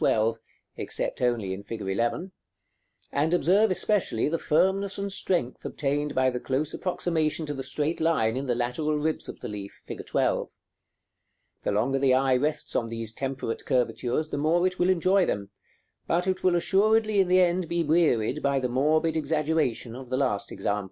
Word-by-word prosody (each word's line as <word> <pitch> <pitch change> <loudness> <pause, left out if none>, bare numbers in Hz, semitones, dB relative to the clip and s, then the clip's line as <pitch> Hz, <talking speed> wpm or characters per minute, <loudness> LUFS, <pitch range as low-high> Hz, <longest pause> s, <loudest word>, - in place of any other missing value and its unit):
12, 115 +1 +2 0.4
except - - -3
only 115 -6 0
in 95 - -6
fig. 115 +2 -7
11; 115 - -1 0.8
and 150 +4 +1
observe 195 +5 +4
especially 185 - +1
the 165 +2 -1
firmness 190 +5 +1
and 200 -1 -3
strength 170 -11 -1
obtained 145 +1 -2
by 130 0 +3
the 125 - -3
close 140 +5 -2
approximation 165 -3 -1
to 145 - -3
the 135 - -5
straight 150 +4 -2
line 155 -9 +2
in 135 +1 -3
the 120 - +1
lateral 125 +6 -1
ribs 155 +1 -2
of - - -9
the - - -5
leaf, 100 -2 -8
fig. - - -7
12. - - 0 1.1
The - - -1
longer 120 +7 +1
the 135 -1 +4
eye 130 0 +3
rests 150 +4 -1
on 115 - +1
these 115 -1 -4
temperate 130 -3 -4
curvatures 125 +4 0
the 145 - -3
more 165 +4 +2
it 185 0 -1
will 180 - +3
enjoy 185 +1 +3
them, 100 0 -3 0.6
but 175 +2 +1
it 190 -1 -1
will 185 -1 +4
assuredly 215 +4 +3
in 190 - +4
the 185 +1 +4
end 180 -1 +2
be 170 0 +1
wearied 150 -5 +2
by 140 -1 +1
the 125 -1 -1
morbid 155 +5 +2
exaggeration 150 -6 0
of 130 -1 -9
the 130 - 0
last 125 -7 0
example. 100 +1 -1
150 Hz, 180 wpm, -27 LUFS, 125-175 Hz, 1.1 s, observe